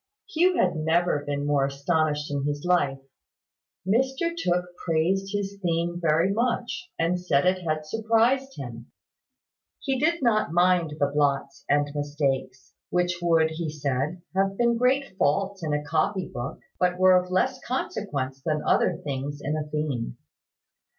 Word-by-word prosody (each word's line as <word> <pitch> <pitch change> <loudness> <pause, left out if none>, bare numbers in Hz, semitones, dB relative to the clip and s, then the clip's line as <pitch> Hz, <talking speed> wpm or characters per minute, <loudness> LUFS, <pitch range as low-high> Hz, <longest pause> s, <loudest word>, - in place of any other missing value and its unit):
Hugh 365 -1 +2
had 170 - +2
never 160 -1 +1
been 145 0 -2
more 145 -1 +2
astonished 150 +1 0
in 140 -1 -1
his 145 +2 -2
life. 175 -7 +2 0.9
Mr 265 - +1
Tooke 180 - -1
praised 180 +4 +1
his 200 -1 -3
theme 175 0 -1
very 165 +4 +2
much, 240 - -1
and 170 +2 +1
said 160 -5 +1
it 185 0 +2
had 155 -2 -2
surprised 230 - +1
him. 120 -3 -7 0.9
He 270 -2 -1
did 335 +1 +1
not 215 -7 +2
mind 175 -3 +3
the 145 - +4
blots 140 -2 0
and 145 0 +2
mistakes, 140 -3 -2 0.2
which 180 0 0
would, 165 -2 +3
he 160 0 -3
said, 150 +3 -2
have 195 0 +1
been 235 -1 +3
great 250 -2 +1
faults 190 +6 +1
in 155 - -1
a 150 0 0
copy 165 +5 0
book, 120 +5 -5 0.2
but 180 0 +2
were 185 0 +6
of 180 0 +2
less 255 +9 0
consequence 140 - -3
than 150 +1 -1
other - - +2
things 145 0 -4
in 150 +1 -2
a 150 -1 -4
theme. 145 - -3
170 Hz, 150 wpm, -26 LUFS, 145-195 Hz, 0.9 s, were